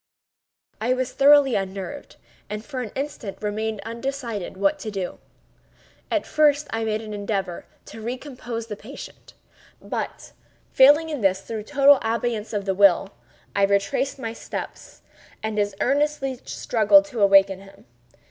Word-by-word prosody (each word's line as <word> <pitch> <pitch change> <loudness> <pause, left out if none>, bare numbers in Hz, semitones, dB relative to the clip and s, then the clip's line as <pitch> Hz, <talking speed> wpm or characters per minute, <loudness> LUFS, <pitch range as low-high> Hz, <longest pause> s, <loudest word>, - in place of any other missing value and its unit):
I 250 +3 +2
was 255 0 -2
thoroughly 280 -1 +6
unnerved, 195 +7 -4 0.3
and 210 +1 -5
for 265 -3 -5
an 230 - -5
instant 265 -7 -5
remained 215 0 -3
undecided 235 -5 -4
what 195 0 +1
to 220 - -5
do. 195 -3 -5 0.9
At - - 0
first 300 -1 +3
I 225 0 -1
made 220 0 -1
an 215 -1 -7
endeavor 200 -4 -3 0.2
to 225 - -10
recompose 245 -1 -5
the 215 -2 -6
patient; 240 +7 -11 0.4
but, - - -5 0.4
failing 290 +5 +6
in 295 -5 -4
this 190 -1 +2
through 220 -2 -6
total 285 0 +5
abeyance 225 -1 -2
of 205 -3 -2
the 195 - +1
will, 195 0 +4 0.4
I 200 - +2
retraced 200 +9 +1
my 230 -4 -5
steps - - -8 0.4
and 220 -1 -2
as 205 -1 0
earnestly 275 -1 0
struggled 245 +6 +4
to 250 -7 -5
awaken 195 -1 +5
him. 195 0 -16
225 Hz, 145 wpm, -24 LUFS, 200-270 Hz, 0.9 s, thoroughly